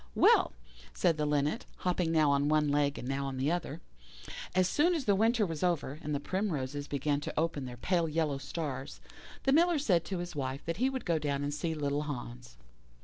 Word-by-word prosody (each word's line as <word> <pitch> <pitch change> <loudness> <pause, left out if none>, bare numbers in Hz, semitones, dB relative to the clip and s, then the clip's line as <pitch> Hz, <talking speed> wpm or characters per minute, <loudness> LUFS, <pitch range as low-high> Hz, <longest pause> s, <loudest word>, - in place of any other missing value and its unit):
"Well," - - +5 0.4
said 155 - +2
the 150 -1 0
Linnet, 150 +7 0
hopping 180 -2 0
now 155 -3 +4
on 140 +1 +2
one 155 -1 +3
leg 145 0 +1
and 125 - -6
now 135 +1 -1
on 135 -1 -4
the 135 +4 +1
other, 170 -2 -3 0.7
"as 185 -1 +4
soon 340 - +3
as 295 -5 -2
the 205 - +4
winter 225 +2 +3
was 165 -4 -4
over, 155 -5 0
and 150 0 -2
the - - 0
primroses 145 -6 -2
began 145 +1 0
to 145 - -3
open 155 -4 -1
their 125 -1 -7
pale 170 +4 +1
yellow 155 -3 0
stars, 140 -1 -5 0.4
the 270 - +3
Miller 340 +2 +4
said 185 - +2
to 190 - -3
his 175 -1 -5
wife 135 0 -3
that 165 +1 -2
he 255 +4 +2
would 265 -1 -4
go 165 -2 +1
down 145 -2 -1
and 145 0 -2
see 160 +2 -2
little 145 -1 -1
Hans. 125 - -7
150 Hz, 210 wpm, -31 LUFS, 140-175 Hz, 0.7 s, Well